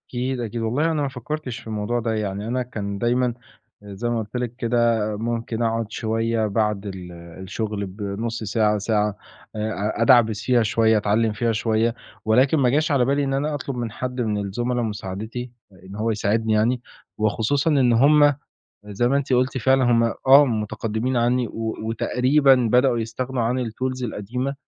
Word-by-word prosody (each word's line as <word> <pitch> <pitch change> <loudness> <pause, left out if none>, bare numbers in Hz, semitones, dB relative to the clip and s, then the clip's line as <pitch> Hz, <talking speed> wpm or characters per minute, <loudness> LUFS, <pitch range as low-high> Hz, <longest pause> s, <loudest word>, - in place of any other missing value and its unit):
أكيد، 125 +1 -2
أكيد. 115 0 -4
والله 135 +9 0
أنا 155 -2 -1
ما 140 - 0
فكّرتش 135 -1 -5
في - - -14
الموضوع 110 +2 -2
ده. 115 -1 -1
يعني 105 -1 -3
أنا 125 +2 -1
كان 100 -5 -5
دايمًا 120 +3 +1 0.5
آآ 100 -1 -9
زي 120 +5 -3
ما 120 -1 0
قُلت 110 +1 -7
لك 120 -1 -3
كده، 120 -1 +1 0.2
ممكن 115 0 -3
أقعد 115 0 0
شوية 115 0 -1
بعد 105 -1 -1
ال 95 -3 -7
الشُغل 95 +5 -5
بنُص 105 +4 -4
ساعة، 105 0 +1
ساعة، 105 0 0 0.4
آآ 110 0 -2
أ 105 +3 -2
أدعبِس 115 -3 +4
فيها 125 -2 +3
شوية، 110 0 +3
أتعلّم 105 +1 +1
فيها 115 +2 0
شوية، 110 +1 +1 0.3
ولكن 130 +7 +3
ما 130 -4 +3
جاش 150 +4 +1
على 135 -4 +3
بالي 140 +2 +1
إن 135 -1 -1
أنا 145 +3 -1
أطلُب 140 -1 -5
من 120 -2 -3
حد 125 +3 -4
من 110 -3 -1
الزملا 120 +5 -2
مساعدتي، 110 +3 -5 0.2
آآ، 95 -3 -19
إن 95 +1 -10
هو 110 +2 0
يساعدني 110 +1 0
يعني 115 +3 +2 0.4
وخصوصًا 110 +8 +1
إن 130 -5 +3
هم 145 +4 +5 0.5
زي 105 +4 -1
ما 135 - +2
أنتِ 140 -1 -1
قُلتِ 130 +1 +2
فعلًا 130 +2 +3
هم 120 -1 +3 0.2
آه 135 +2 +8
متقدّمين 110 +1 -2
عنّي، 120 0 +1
و 110 -1 -4
وتقريبًا 130 +5 +3 0.2
بدأوا 125 -1 +4
يستغنوا 120 +3 -3
عن 120 +3 0
الTools 130 +3 -3
القديمة، 125 +5 -3
115 Hz, 180 wpm, -23 LUFS, 110-125 Hz, 0.5 s, آه